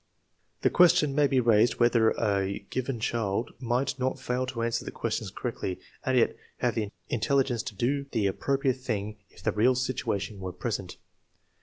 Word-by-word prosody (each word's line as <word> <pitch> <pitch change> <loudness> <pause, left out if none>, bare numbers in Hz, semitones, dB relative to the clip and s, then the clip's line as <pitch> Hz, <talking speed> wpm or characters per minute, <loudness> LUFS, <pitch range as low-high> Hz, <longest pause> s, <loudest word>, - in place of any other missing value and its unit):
The - - +4
question 170 -5 +5
may 145 0 +4
be 135 -2 +2
raised 115 -1 +4
whether 120 -2 +4
a 100 -2 0
given 130 -1 -2
child 110 -1 -1
might 125 +2 -1
not 130 +1 -1
fail 130 0 -1
to 115 -2 -3
answer 115 0 0
the - - -5
questions 110 -2 -3
correctly 95 -3 -4 0.2
and 130 -1 +1
yet 120 - +3 0.2
have 120 -2 +1
the 105 -1 -2 0.2
intelligence 125 0 +1
to 105 - -7
do 140 +6 0
the 110 -4 +1
appropriate 135 +6 +1
thing 105 -4 -3
if 85 - -17
the - - +2
real 120 +5 +3
situation 120 -6 -2
were 95 -1 -5
present. 90 - -4
120 Hz, 170 wpm, -28 LUFS, 105-130 Hz, 0.2 s, question